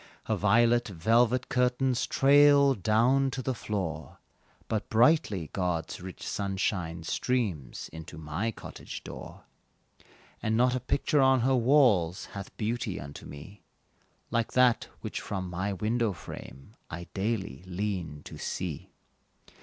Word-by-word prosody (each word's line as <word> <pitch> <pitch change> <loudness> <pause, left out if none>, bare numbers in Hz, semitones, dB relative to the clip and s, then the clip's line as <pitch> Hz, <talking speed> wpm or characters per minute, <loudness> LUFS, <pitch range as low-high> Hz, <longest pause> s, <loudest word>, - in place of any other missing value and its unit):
Her - - 0
violet 120 +3 +3
velvet 115 +7 +2
curtains 125 0 +1
trail 140 0 +6
Down 120 +6 +2
to 130 0 -5
the 130 - -1
floor, 95 -9 -4 0.5
But 110 -1 -2
brightly 110 - +3
God's 90 -3 -2
rich 95 0 -8
sunshine 95 -4 -2
streams 90 - -2
Into 80 +1 -9
my 80 +8 -2
cottage 115 - -8
door; - - -9 1.0
And 110 0 0
not 125 +1 +4
a 130 - 0
picture 140 +3 +1
on 130 -1 +5
her 130 +3 +2
walls, 115 - +3
Hath 100 -1 -8
beauty 110 -2 -2
unto 70 +1 -9
me, 90 +8 -11 0.7
Like 115 -1 0
that 125 -2 +4
which - - -4
from 95 -2 -4
my 95 +4 -2
window 110 +3 0
frame 70 +1 -10 0.2
I 85 +2 -6
daily 95 - -2
lean 90 -6 -3
to - - -10
see. 85 -6 -4
105 Hz, 130 wpm, -29 LUFS, 90-125 Hz, 1.0 s, trail